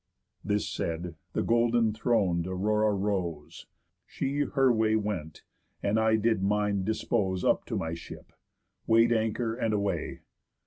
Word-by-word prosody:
This 105 0 0
said, 85 +1 -3 0.2
the - - 0
golden 115 -1 +2
thron'd 100 -7 +1
Aurora 105 +3 +1
rose, 95 -7 -3 0.4
She 140 +2 -3
her 135 -3 +3
way 110 -1 +2
went, 100 -8 -3 0.4
and 105 +2 +2
I 110 0 +3
did 110 -2 +1
mine 100 0 +1
dispose 100 -3 -1
Up - - +2
to - - -4
my 80 0 -3
ship, 85 - -10 0.5
weigh'd 115 +1 +5
anchor, 115 +1 0
and 115 -2 -1
away. 100 -1 -2
105 Hz, 135 wpm, -28 LUFS, 95-115 Hz, 0.5 s, weigh'd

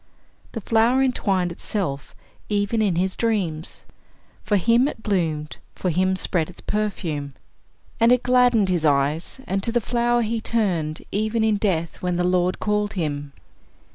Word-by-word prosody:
The 225 - -4
flower 230 +5 +3
entwined 195 -9 0
itself 165 -6 -4 0.3
even 205 +2 0
in 200 -5 +1
his 185 +2 0
dreams 185 -9 -2 0.6
for 205 - +2
him 230 +7 +3
it 225 -6 -7
bloomed, 160 -7 -1 0.2
for 180 - -1
him 185 +3 +1
spread 175 -3 0
its 180 - -13
perfume. 170 -9 -3 0.7
And 230 +1 +5
it 250 -1 +3
gladdened 245 -5 +4
his 175 -3 0
eyes, 150 - +1
and 195 +1 -1
to 230 - +1
the 240 - +2
flower 240 +1 +1
he 225 +1 -2
turned, 175 -10 -1
even 220 +2 0
in 220 -1 +2
death, 170 -6 -1
when 180 -1 -1
the 180 - 0
Lord 180 0 +1
called 210 0 0
him. 145 -6 -3
195 Hz, 155 wpm, -23 LUFS, 170-225 Hz, 0.7 s, And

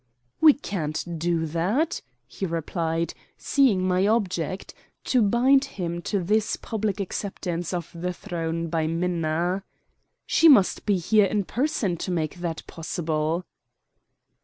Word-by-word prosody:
"We 310 -2 +8
can't 170 - -4
do 170 0 0
that," 195 - 0 0.2
he 160 +10 -5
replied, 165 0 -2 0.2
seeing 215 -10 +2
my 185 +2 +2
object 190 -5 -1 0.3
to 255 - +2
bind 250 +6 +4
him 175 -2 -3
to 195 +1 -1
this 215 +4 +1
public 215 -3 -3
acceptance 180 -3 -3
of 175 -3 -4
the 175 +2 -3
throne 165 -1 -3
by 160 -1 0
Minna. 170 +2 -1 0.6
"She 330 - +5
must 225 -8 +4
be 205 -2 +3
here 210 +4 +4
in 205 +1 0
person 230 - -1
to 185 - -4
make 165 -2 -2
that 170 -2 -4
possible." 160 0 -2
180 Hz, 130 wpm, -25 LUFS, 165-205 Hz, 0.6 s, We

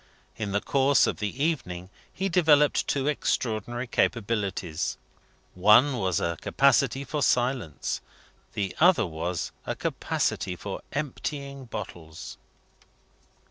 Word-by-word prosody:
In 105 -3 -3
the 100 +1 +1
course 140 0 +4
of - - -1
the 110 +7 -2
evening 95 - -2 0.2
he 195 - -2
developed 155 -5 +4
two 135 -1 0
extraordinary 120 -4 -1
capacities. 100 -9 -1 0.6
One 105 +9 +5
was 95 -5 +1
a 85 -1 -2
capacity 135 0 +3
for 150 0 -3
silence; 125 - 0 0.5
the 95 -3 -2
other 175 - +5
was 85 +1 -3 0.2
a - - -1
capacity 90 - -1
for 95 +2 -6
emptying 140 -1 -4
bottles. 80 -8 -8
115 Hz, 110 wpm, -27 LUFS, 95-140 Hz, 0.6 s, One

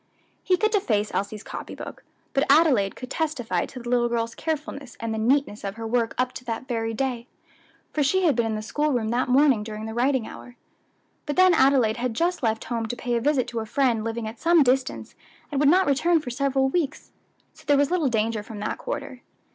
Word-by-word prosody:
He 365 - +2
could 430 +3 +1
deface 215 - +1
Elsie's 205 +2 -3
copy - - -7
book, - - -9 0.3
but 275 - +2
Adelaide 275 -10 +4
could 255 0 -9
testify 305 -8 -1
to 255 - -9
the 240 - -9
little 240 -1 +2
girl's 230 -1 -1
carefulness 295 -5 -5
and 230 -1 -3
the 220 - -2
neatness 245 -1 +1
of 200 0 -4
her 225 0 -6
work 230 0 0
up 255 0 +1
to 250 - -9
that 235 +2 -4
very 225 -3 -2
day, 245 0 -3 0.7
for 305 - 0
she 370 +7 +2
had 310 -7 +3
been 235 -1 +1
in 220 - -2
the 215 - -4
school 295 +6 0
room 225 -3 0
that 245 +2 0
morning 265 -3 +4
during 215 0 -6
the 220 - -5
writing 250 0 +1
hour. 245 - -11 0.7
But 290 - -2
then 370 -1 +6
Adelaide 265 -7 +4
had 245 -1 -2
just 345 +7 0
left 220 -2 0
home 230 -2 -3
to 245 - -4
pay 240 0 -2
a 235 - 0
visit 275 -1 +1
to 235 -1 -3
a 220 - -4
friend 235 -2 +1
living 225 0 -3
at 220 +1 -8
some 335 -1 +5
distance, 260 +1 0 0.4
and 280 - -1
would 285 -1 +5
not 370 +4 +5
return 320 +5 +3
for 255 -5 -6
several 270 +1 +1
weeks, 310 -1 -2 0.4
so - - -18
there 290 -1 +5
was 285 +2 +2
little 335 -7 +2
danger 225 -1 0
from 210 +1 -10
that 215 - -3
quarter. 265 - -5
250 Hz, 225 wpm, -25 LUFS, 225-285 Hz, 0.7 s, then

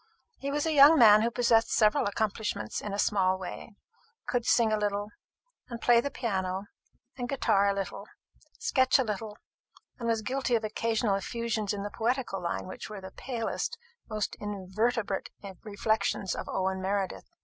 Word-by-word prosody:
He 275 - -3
was 290 +2 -1
a 320 - +1
young 295 +2 +8
man 215 -4 +8
who 230 - +2
possessed 235 -1 +3
several 215 -2 +3
accomplishments 205 - -2
in 210 - -5
a 200 - -3
small 190 -2 +2
way 190 +3 -8 0.5
could 245 -1 -1
sing 225 -2 +4
a - - +2
little, 205 0 -2 0.6
and 235 -1 -6
play 235 0 +5
the 280 - -3
piano 190 -7 -2 0.6
and 245 0 -3
guitar 200 -7 +2
a - - +2
little, 195 -1 -5 0.5
sketch 260 0 +3
a 265 - +2
little, 210 -1 -5 0.6
and 235 - -3
was 225 -1 0
guilty 260 0 0
of 225 - 0
occasional 220 0 0
effusions 220 +1 -2
in 200 -1 -3
the 205 - -5
poetical 230 -4 -1
line 170 - -3
which 185 - -8
were 210 -2 -7
the 190 0 -9
palest, 235 -1 -3 0.3
most 215 -2 -2
invertebrate 205 +1 -2 0.3
reflections 205 -2 -1
of - - -6
Owen 190 0 -1
Meredith. 195 0 -2
215 Hz, 165 wpm, -29 LUFS, 200-235 Hz, 0.6 s, young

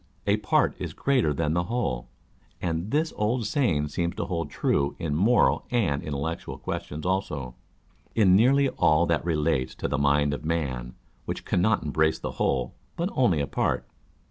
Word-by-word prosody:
A 100 +1 +3
part 105 - +2
is - - -4
greater 130 - +1
titan 75 +1 0
the 85 +1 0
whole: 65 - -2 0.5
and 85 +2 -2
this 155 +4 0
old 110 +2 0
saying 100 - +1
seems 85 +3 -2
to - - -2
hold 85 -3 -3
true 70 0 0
in 75 -3 -2
moral 105 +11 +3
and 100 - +1
intellectual 75 +3 -4
questions 75 +3 -5
also 90 -8 -1
â€" - - -17 0.6
in 95 -5 +5
nearly 135 +6 +5
all 85 -8 +3
that 85 -2 0
relates 75 -5 0
to - - -3
the 75 - -1
mind 70 +1 +3
of - - -5
man, 65 -7 -2 0.3
which - - -5
cannot 100 +4 +2
embrace 80 +1 +1
the - - -5
whole, 65 -2 0 0.2
but 170 +3 -1
only 100 - +2
a - - 0
part. - - -1
85 Hz, 170 wpm, -26 LUFS, 75-105 Hz, 0.6 s, in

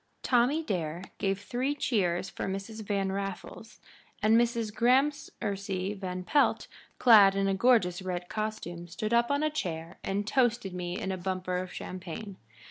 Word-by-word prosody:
Tommy 260 +6 +3
Dare 175 - -3 0.2
gave 195 -1 0
three 255 +7 -1
cheers 190 -10 0
for - - -5
Mrs. 195 +3 -5
Van 195 -2 -1
Raffles, 195 +3 -6 0.4
and 215 +1 +5
Mrs. 230 -2 +1
Gramercy 210 -7 0
Van 185 -2 -5
Pelt, 290 +10 +2 0.3
clad 205 -5 +7
in 195 0 +1
a 195 - +2
gorgeous 195 -4 +3
red 180 -1 -4
costume, 195 -6 -4
stood 215 +6 -3
up 235 0 +3
on 285 +1 +1
a 310 - +1
chair 170 - -4
and 200 +1 -1
toasted 235 -5 +1
me 180 0 -4
in 190 - -3
a 190 - -2
bumper 185 0 -2
of 180 0 -4
champagne. 185 +2 -7
195 Hz, 155 wpm, -29 LUFS, 185-235 Hz, 0.4 s, clad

